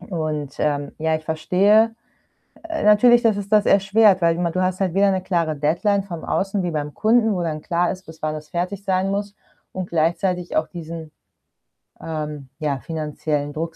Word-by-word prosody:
Und, 155 Hz, -6 st, -4 dB
ähm, 145 Hz, -1 st, -1 dB
ja, 160 Hz, 0 st, 0 dB
ich 155 Hz, -, -10 dB
verstehe, 195 Hz, +8 st, +3 dB, 0.7 s
äh, 330 Hz, -1 st, -4 dB
natürlich 235 Hz, +3 st, +6 dB
dass 225 Hz, -4 st, +3 dB
es 205 Hz, -1 st, -5 dB
das 210 Hz, 0 st, +3 dB
erschwert, 195 Hz, -1 st, +4 dB
weil 165 Hz, 0 st, +3 dB
ma 175 Hz, -1 st, 0 dB
du 185 Hz, +2 st, -1 dB
hast 185 Hz, +1 st, -1 dB
halt 185 Hz, -3 st, 0 dB
weder 200 Hz, +1 st, +4 dB
'ne 190 Hz, -1 st, -1 dB
klare 170 Hz, -4 st, -1 dB
Deadline 175 Hz, +8 st, +1 dB
vom 170 Hz, -5 st, -7 dB
Außen, 195 Hz, 0 st, -1 dB
wie 175 Hz, -, -2 dB
beim 150 Hz, -2 st, -4 dB
Kunden, 220 Hz, 0 st, +3 dB
wo 180 Hz, -, -2 dB
dann 155 Hz, -2 st, -3 dB
klar 175 Hz, +1 st, 0 dB
ist, 190 Hz, 0 st, -11 dB
bis 160 Hz, 0 st, -13 dB
wann 155 Hz, 0 st, -1 dB
das 155 Hz, -1 st, -8 dB
fertig 180 Hz, +4 st, -3 dB
sein 190 Hz, 0 st, 0 dB
muss 200 Hz, +1 st, -3 dB, 0.4 s
und 185 Hz, -1 st, -5 dB
gleichzeitig 175 Hz, +2 st, 0 dB
auch 155 Hz, 0 st, +1 dB
diesen, 165 Hz, -2 st, -8 dB, 0.9 s
ähm, 150 Hz, -3 st, -5 dB
ja, 145 Hz, -4 st, -1 dB
finanziellen 150 Hz, -1 st, -3 dB
Druck, 165 Hz, +2 st, -4 dB
175 Hz, 190 wpm, -22 LUFS, 155-195 Hz, 0.9 s, natürlich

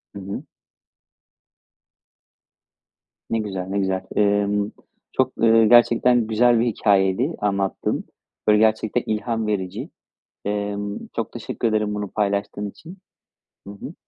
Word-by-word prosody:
Hı -, -, -6 dB
hı. 100 Hz, +1 st, -6 dB, 2.9 s
Ne 115 Hz, -, 0 dB
güzel, 95 Hz, -4 st, -4 dB
ne 100 Hz, +1 st, -1 dB
güzel. 95 Hz, -1 st, 0 dB
Emm, 100 Hz, 0 st, +2 dB, 0.4 s
çok, 130 Hz, 0 st, 0 dB
ııı, 115 Hz, 0 st, +5 dB
gerçekten 120 Hz, 0 st, +5 dB
güzel 120 Hz, +2 st, +4 dB
bir 115 Hz, -, +2 dB
hikâyeydi 105 Hz, -, +2 dB
anlattığın. 100 Hz, -2 st, -1 dB, 0.4 s
Böyle, 105 Hz, 0 st, +6 dB
gerçekten 110 Hz, +2 st, +2 dB
ilham 110 Hz, +1 st, -1 dB
verici. 95 Hz, -4 st, -3 dB, 0.6 s
Emm, 105 Hz, 0 st, -3 dB
çok -, -, -2 dB
teşekkür -, -, -3 dB
ederim 105 Hz, -1 st, 0 dB
bunu 105 Hz, 0 st, -3 dB
paylaştığın 100 Hz, 0 st, -1 dB
için. 165 Hz, -, -13 dB, 0.7 s
Hı 100 Hz, -, -7 dB
hı. 100 Hz, -, -9 dB
105 Hz, 115 wpm, -22 LUFS, 100-115 Hz, 2.9 s, Böyle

